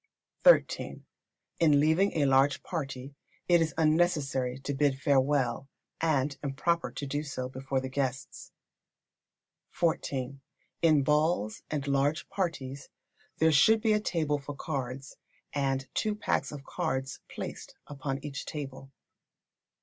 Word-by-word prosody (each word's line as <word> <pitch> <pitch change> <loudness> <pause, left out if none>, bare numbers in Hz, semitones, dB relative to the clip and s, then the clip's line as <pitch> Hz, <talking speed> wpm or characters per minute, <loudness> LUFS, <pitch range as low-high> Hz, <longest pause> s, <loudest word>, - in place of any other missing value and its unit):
xiii. - - +4 0.6
In 150 -4 +5
leaving 160 +7 +3
a 150 -3 +2
large 135 0 +3
party 135 -5 -5 0.3
it 175 -1 +5
is 160 -1 -1
unnecessary 150 -6 +2
to 135 +1 -4
bid 135 -1 +1
farewell, 135 -2 +1 0.3
and 145 -3 +1
improper 150 +5 0
to 145 - -6
do 145 +2 -2
so 135 -4 -4
before 130 +1 -2
the 130 - -4
guests. 130 0 -4 1.2
xiv. 140 -5 -1 0.4
In 155 -4 +5
balls 150 -7 +1
and 145 -2 -3
large 140 +2 +1
parties 140 -8 -3 0.5
there 160 0 +4
should 220 +10 +6
be 220 -1 +3
a 210 - +3
table 155 -7 0
for 145 +1 -7
cards, 135 -2 -5 0.4
and 135 -1 0
two 215 -1 0
packs 210 - -1
of 145 -2 -8
cards 135 -1 -3
placed - - -7
upon 135 -1 -4
each 140 -2 -5
table. 135 -2 -7
140 Hz, 125 wpm, -29 LUFS, 135-155 Hz, 1.2 s, should